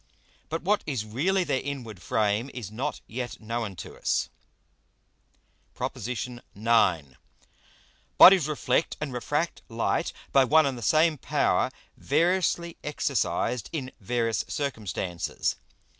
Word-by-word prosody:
But 165 Hz, +1 st, -3 dB
what 205 Hz, +3 st, +2 dB
is 130 Hz, -8 st, -2 dB
really 175 Hz, -, +1 dB
their 130 Hz, -6 st, 0 dB
inward 125 Hz, -8 st, -6 dB
Frame 105 Hz, +6 st, 0 dB
is 110 Hz, -6 st, -6 dB
not 135 Hz, +7 st, -3 dB
yet 120 Hz, +2 st, -5 dB
known 115 Hz, -2 st, -3 dB
to -, -, -9 dB
us. -, -, 0 dB, 1.5 s
PROP. -, -, -3 dB
IX. 120 Hz, +2 st, -4 dB, 1.8 s
_Bodies 185 Hz, -5 st, +9 dB
reflect 155 Hz, +2 st, 0 dB
and 150 Hz, -4 st, -4 dB
refract 150 Hz, +7 st, -1 dB
Light 115 Hz, 0 st, 0 dB, 0.2 s
by 135 Hz, -, +6 dB
one 155 Hz, +4 st, +5 dB
and 135 Hz, -2 st, -1 dB
the 120 Hz, -, -8 dB
same 155 Hz, +5 st, +3 dB
power, -, -, +1 dB, 0.3 s
variously 170 Hz, +2 st, +1 dB
exercised 120 Hz, -, -1 dB
in 135 Hz, -6 st, -4 dB
various 115 Hz, +1 st, 0 dB
Circumstances. 100 Hz, -, -2 dB
130 Hz, 115 wpm, -27 LUFS, 110-155 Hz, 1.8 s, Bodies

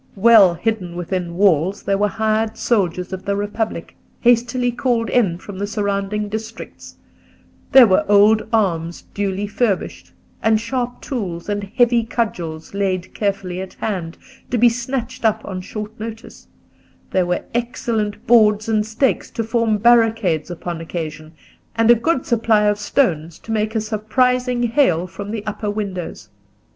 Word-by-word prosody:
Well 205 Hz, -4 st, +6 dB
hidden 190 Hz, -4 st, -2 dB
within 175 Hz, 0 st, -3 dB
walls 190 Hz, 0 st, +2 dB
there 195 Hz, 0 st, 0 dB
were 210 Hz, -, +3 dB
hired 220 Hz, +1 st, -1 dB
soldiers 180 Hz, -5 st, 0 dB
of 190 Hz, 0 st, -5 dB
the 200 Hz, -, -1 dB
Republic, 205 Hz, +2 st, -3 dB, 0.3 s
hastily 245 Hz, +1 st, +2 dB
called 240 Hz, -2 st, -1 dB
in 195 Hz, -9 st, +2 dB
from 190 Hz, +1 st, -10 dB
the 205 Hz, -, -2 dB
surrounding 205 Hz, 0 st, -2 dB
districts; 220 Hz, +2 st, -8 dB, 0.8 s
there 265 Hz, -2 st, +9 dB
were 190 Hz, -4 st, +3 dB
old 210 Hz, +2 st, +5 dB
arms 170 Hz, -7 st, 0 dB
duly 200 Hz, 0 st, -2 dB
furbished, 205 Hz, -1 st, -2 dB, 0.3 s
and 220 Hz, -1 st, +3 dB
sharp 245 Hz, +1 st, -3 dB
tools 195 Hz, -, -5 dB
and 205 Hz, -1 st, -2 dB
heavy 240 Hz, -2 st, +4 dB
cudgels 175 Hz, -9 st, -4 dB
laid 190 Hz, -2 st, -2 dB
carefully 195 Hz, -3 st, -2 dB
at 190 Hz, -, -8 dB
hand, 180 Hz, -6 st, -4 dB, 0.3 s
to 250 Hz, -, 0 dB
be 240 Hz, +1 st, +6 dB
snatched 240 Hz, +1 st, -4 dB
up 220 Hz, -1 st, +1 dB
on 185 Hz, -2 st, -5 dB
short 215 Hz, +3 st, -7 dB
notice; 225 Hz, +1 st, -9 dB, 0.6 s
there 185 Hz, -2 st, +1 dB
were 180 Hz, -, -1 dB
excellent 230 Hz, -2 st, -2 dB
boards 215 Hz, -3 st, +4 dB
and 215 Hz, -1 st, +1 dB
stakes 230 Hz, +4 st, 0 dB
to 230 Hz, -, -3 dB
form 225 Hz, -1 st, +1 dB
barricades 225 Hz, -8 st, +3 dB
upon 175 Hz, -1 st, -5 dB
occasion, 155 Hz, -2 st, -6 dB, 0.4 s
and 230 Hz, +1 st, +5 dB
a -, -, +10 dB
good 265 Hz, +4 st, 0 dB
supply 225 Hz, -3 st, +2 dB
of 210 Hz, 0 st, +2 dB
stones 170 Hz, -, 0 dB
to 225 Hz, -, -9 dB
make 215 Hz, 0 st, -1 dB
a -, -, +2 dB
surprising 245 Hz, +3 st, 0 dB
hail 230 Hz, -, +2 dB
from 195 Hz, +2 st, -8 dB
the 215 Hz, -1 st, -5 dB
upper 210 Hz, 0 st, -3 dB
windows. 195 Hz, -, -5 dB
210 Hz, 150 wpm, -20 LUFS, 190-230 Hz, 0.8 s, a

